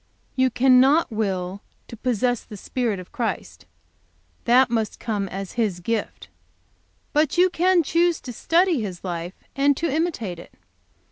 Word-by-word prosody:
"You 260 -1 +3
cannot 260 +4 +4
will 195 -3 -2 0.3
to - - -9
possess 245 0 0
the 210 - -10
spirit 230 -1 -2
of 180 - -11
Christ; 185 - -4 0.8
that 245 +1 +5
must 225 -2 -1
come 205 -4 -2
as 195 0 -6
His 210 -7 -1
gift; 220 +4 -3 0.9
but 300 +1 +2
you 365 +1 +5
can 355 0 +3
choose 340 +3 +2
to 250 - -7
study 335 +2 +2
His 190 -5 -6
life, 175 0 -5 0.2
and 280 0 +3
to 335 - -2
imitate 290 - -2
it. - - -14
240 Hz, 145 wpm, -23 LUFS, 195-285 Hz, 0.9 s, that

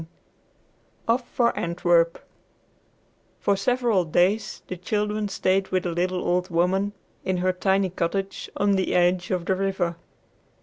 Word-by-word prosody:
IX 160 - -17 1.0
OFF 240 +1 +2
FOR 235 -1 +2
ANTWERP 170 -1 +2 1.2
For 200 - +2
several 235 -2 +1
days 180 +6 +1
the 185 - -4
children 210 +3 -1
stayed 190 0 +1
with 185 -1 0
the 175 - -2
little 180 +2 -1
old 180 +1 +1
woman 190 +4 +1 0.3
in 185 -1 0
her 185 +1 +1
tiny 190 0 +1
cottage 195 +3 -3
on 205 0 +2
the 190 -1 +1
edge 180 0 +2
of 180 -3 -1
the 190 - +2
river. 190 -3 -1
185 Hz, 140 wpm, -25 LUFS, 175-200 Hz, 1.2 s, OFF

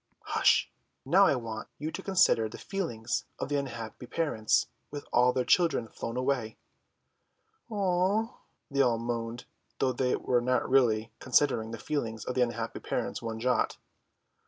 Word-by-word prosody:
"Hush. - - +3 0.4
Now - - +6
I - - +3
want 115 -3 -5
you 155 +2 -4
to 190 - -5
consider 185 - +3
the - - -9
feelings 120 - -3
of - - -4
the 145 - +1
unhappy 125 -3 -5
parents 120 -10 +1 0.2
with 145 -1 -7
all 125 +1 +5
their 125 0 -1
children 170 - +3
flown 115 +2 -6
away." 125 -4 -1 1.1
"Oo!" 200 +3 +1 0.4
they 140 0 +3
all 120 -3 +3
moaned, 115 +1 -4 0.3
though 130 - +2
they 125 0 +1
were 125 -1 +1
not 125 +1 +1
really 115 -4 +3
considering 130 -4 +2
the 115 - -5
feelings 115 -8 -3
of 125 - -2
the 130 - +1
unhappy 115 -2 -1
parents - - -3
one 115 -1 -4
jot. 125 +2 +1
125 Hz, 155 wpm, -29 LUFS, 115-145 Hz, 1.1 s, Now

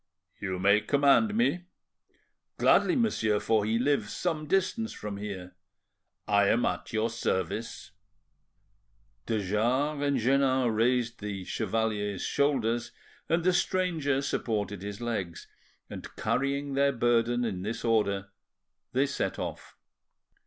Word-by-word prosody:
"You 95 -1 -3
may 100 +3 +4
command 145 - +3
me." 180 -6 +1 0.9
"Gladly, 350 - +4
monsieur; 110 - +1
for 110 -1 +1
he 110 +1 +1
lives 125 -4 +1
some 155 -4 -2
distance 195 +6 0
from 105 -1 -6
here." 95 -3 -6 0.7
"I 100 -1 +4
am 115 +4 +3
at - - -3
your 110 +1 0
service." 115 0 -3 1.4
De 110 - 0
Jars 125 +9 0
and 140 -1 +1
Jeannin 130 0 +2
raised 120 +1 +1
the 100 -2 -5
chevalier's 105 -1 -2
shoulders, 120 -5 0 0.4
and 165 +1 +2
the 185 +1 +3
stranger 170 -7 0
supported 105 -7 -2
his 100 +2 -6
legs, 100 -8 -4 0.4
and - - -9
carrying 140 +1 -1
their 140 +1 +3
burden 120 0 +2
in 95 -5 -3
this 110 +5 -4
order, 100 -4 +1 0.6
they 135 +2 +3
set - - -2
off. - - -6
115 Hz, 125 wpm, -28 LUFS, 105-140 Hz, 1.4 s, may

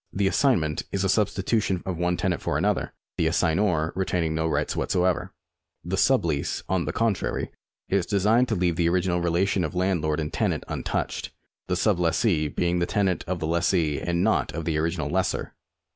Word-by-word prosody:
The 100 0 0
assignment 95 - +2
is 100 0 -1
a 95 - +1
substitution 95 -1 +1
of 95 - -2
one 90 +1 0
tenant 90 -3 -1
for - - -1
another, - - 0 0.3
the 80 - +2
assignor 80 -1 +1
retaining 90 -4 0
no 80 +1 0
rights 75 -1 -1
whatever. 90 0 0 0.5
The - - -2
sub - - +3
lease, 70 - -1
on 95 -3 0
the 75 - -2
con 115 -2 +2
trary, 95 - -3 0.4
is 95 -2 0
designed 110 +5 +3
to - - 0
leave 85 -2 0
the 85 -1 +2
original 90 0 +1
relation 90 +2 +1
of 80 +1 -4
landlord 85 -4 0
and 75 -1 -3
tenant - - 0
untouched, - - -3 0.4
the - - 0
sub - - +2
lessee 85 -2 +2
being 85 +4 0
the 85 - 0
tenant 95 -5 0
of 90 -1 -2
the 80 - -2
lessee 85 -2 +1
and 85 0 0
not 110 -7 +1
of 85 -1 -4
the 80 -2 0
original 80 +1 -1
lessor. - - -1
90 Hz, 190 wpm, -25 LUFS, 80-95 Hz, 0.5 s, sub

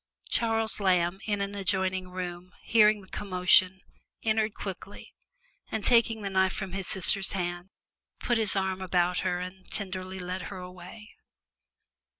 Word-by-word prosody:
Charles 225 -2 +1
Lamb, 180 -2 +2
in 205 -1 0
an 200 0 -3
adjoining 190 -2 -1
room, 180 0 -6
hearing 215 -2 +4
the 190 - -16
commotion, 185 -1 +3 0.4
entered 220 -1 +1
quickly 195 +1 -8 0.6
and 220 - -2
taking 230 -2 +4
the 200 - -2
knife 190 -1 +2
from 195 -2 -5
his 195 0 -3
sister's 190 +1 +2
hand, 175 -1 -3 0.5
put 240 -2 +1
his 215 -3 +3
arm 190 -1 -1
about 180 -1 +1
her 180 -1 -1
and 185 +1 -8
tenderly 185 -1 -5
led 180 0 -4
her 200 - -7
away. 180 +4 -11
190 Hz, 145 wpm, -28 LUFS, 180-205 Hz, 0.6 s, hearing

